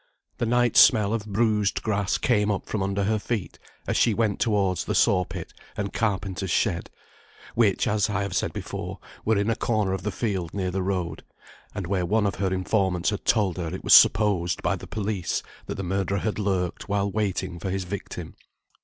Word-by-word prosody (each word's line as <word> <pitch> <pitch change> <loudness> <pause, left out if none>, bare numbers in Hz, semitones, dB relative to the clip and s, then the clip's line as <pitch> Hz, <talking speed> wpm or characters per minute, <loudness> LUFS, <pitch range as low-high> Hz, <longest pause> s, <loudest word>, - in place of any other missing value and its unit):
The 120 - 0
night 120 0 +2
smell 110 -3 +6
of 110 -2 -3
bruised 105 -1 +1
grass 100 -2 0
came 105 -4 +2
up 100 -2 -1
from 105 - -3
under 100 +1 0
her 110 +2 +1
feet, 105 -2 -4 0.3
as - - -1
she 115 - +3
went 110 -3 0
towards 100 -5 +1
the - - -1
saw 90 0 +3
pit - - -8 0.2
and 100 -2 -3
carpenter's 95 -4 -1
shed, 90 -1 0 0.6
which, 110 -5 +2
as 105 -1 +1
I 100 -1 0
have 100 -2 -4
said - - 0
before, - - -6 0.3
were 110 -1 +2
in 100 +3 +1
a - - +1
corner 105 -5 0
of 95 - -3
the 105 - -2
field 95 -5 -3
near 95 -2 -1
the 95 +1 -1
road, 90 -2 -2 0.5
and 100 - -3
where 90 -1 -1
one 110 +3 +2
of 100 - +1
her 95 -2 +1
informants 95 -1 +1
had 105 - -5
told 100 -6 +2
her 85 -2 -3
it 90 +3 -6
was - - +4
supposed 95 -5 +5
by - - +1
the - - -9
police 105 -4 -2 0.2
that - - -4
the 95 - -4
murderer 95 +1 -1
had 110 +1 -2
lurked 95 -2 -2
while 100 0 0
waiting 95 -4 -2
for 95 - -4
his 95 0 -2
victim. 95 +2 -6
100 Hz, 200 wpm, -25 LUFS, 95-105 Hz, 0.6 s, smell